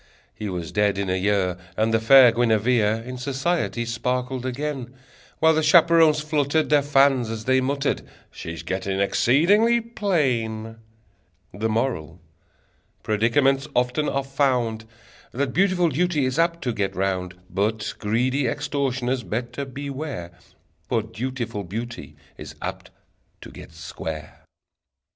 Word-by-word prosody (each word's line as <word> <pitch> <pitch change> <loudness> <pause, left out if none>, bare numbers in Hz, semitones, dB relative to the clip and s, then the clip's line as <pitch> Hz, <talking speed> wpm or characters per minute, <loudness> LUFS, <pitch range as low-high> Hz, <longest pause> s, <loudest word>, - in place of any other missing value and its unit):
He 105 - -5
was 85 -3 -5
dead 105 -1 +1
in 100 -2 -1
a - - +1
year, 95 -2 0 0.2
And 110 +1 +1
the 115 - +4
fair 125 +2 +7
Guinevere 115 -1 +2
In 125 0 -6
society 135 -1 -1
sparkled 125 +2 -2
again, 130 -1 -4 0.4
While 160 0 +4
the 160 - +1
chaperons 160 -1 +5
fluttered 150 0 0
Their 145 -1 +5
fans, 135 -4 +3
as 110 -1 -5
they 130 0 +3
muttered: 140 +2 -1 0.3
"She's 85 -2 -7
getting 95 +1 -2
exceedingly 185 - +3
plain!" 130 - -1 0.8
The 110 +2 -2
Moral: 110 - -2 0.8
Predicaments 135 +6 +2
often 125 +5 +1
are 140 0 -1
found 125 -5 0 0.5
That 130 0 -1
beautiful 180 -1 +2
duty 155 -1 +1
is 130 +5 -1
apt 170 0 +1
to 125 -3 -1
get 100 -3 -2
round: 95 -1 -2
But 110 +3 -1
greedy 125 +6 0
extortioners 130 -1 -1
better 120 +4 -4
beware 135 - -6 0.6
For 115 - +1
dutiful 115 -1 -4
beauty 115 - -7 0.2
is - - -9
apt - - -6 0.5
to - - -11
get - - -12
square! 80 -1 -7
125 Hz, 130 wpm, -23 LUFS, 110-140 Hz, 0.8 s, fair